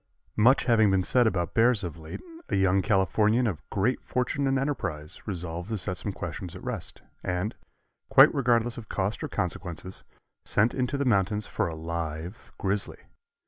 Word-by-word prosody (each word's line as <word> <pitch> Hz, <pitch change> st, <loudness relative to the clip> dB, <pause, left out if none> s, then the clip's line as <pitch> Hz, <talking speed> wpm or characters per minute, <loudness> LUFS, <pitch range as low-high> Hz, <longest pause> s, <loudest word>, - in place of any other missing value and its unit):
Much 125 Hz, +6 st, +5 dB
having 110 Hz, -3 st, +4 dB
been 95 Hz, -1 st, +2 dB
said 125 Hz, +4 st, +3 dB
about 90 Hz, -5 st, -1 dB
bears 115 Hz, -2 st, +4 dB
of 85 Hz, -3 st, -4 dB
late, 80 Hz, -1 st, -8 dB, 0.3 s
a -, -, 0 dB
young 95 Hz, 0 st, +3 dB
Californian 105 Hz, +4 st, +2 dB
of 90 Hz, -8 st, -2 dB
great 110 Hz, +6 st, 0 dB
fortune 135 Hz, +3 st, -1 dB
and 135 Hz, 0 st, +2 dB
enterprise 90 Hz, -, -3 dB
resolved 90 Hz, -1 st, -4 dB
to 110 Hz, -, -1 dB
set 95 Hz, -1 st, -1 dB
some 80 Hz, -, -3 dB
questions -, -, -6 dB
at -, -, -10 dB
rest, -, -, -4 dB, 0.2 s
and, 95 Hz, +5 st, -1 dB, 0.6 s
quite -, -, +8 dB
regardless 120 Hz, -3 st, +1 dB
of 110 Hz, -, -12 dB
cost 95 Hz, +2 st, -2 dB
or -, -, -1 dB
consequences, 90 Hz, +1 st, -4 dB, 0.4 s
sent 110 Hz, +3 st, +2 dB
into 130 Hz, +1 st, -1 dB
the 140 Hz, -, 0 dB
mountains 105 Hz, -2 st, +2 dB
for -, -, -1 dB
a 80 Hz, -, -5 dB
live 80 Hz, +3 st, -5 dB
grizzly. 100 Hz, 0 st, -1 dB
100 Hz, 170 wpm, -27 LUFS, 90-120 Hz, 0.6 s, quite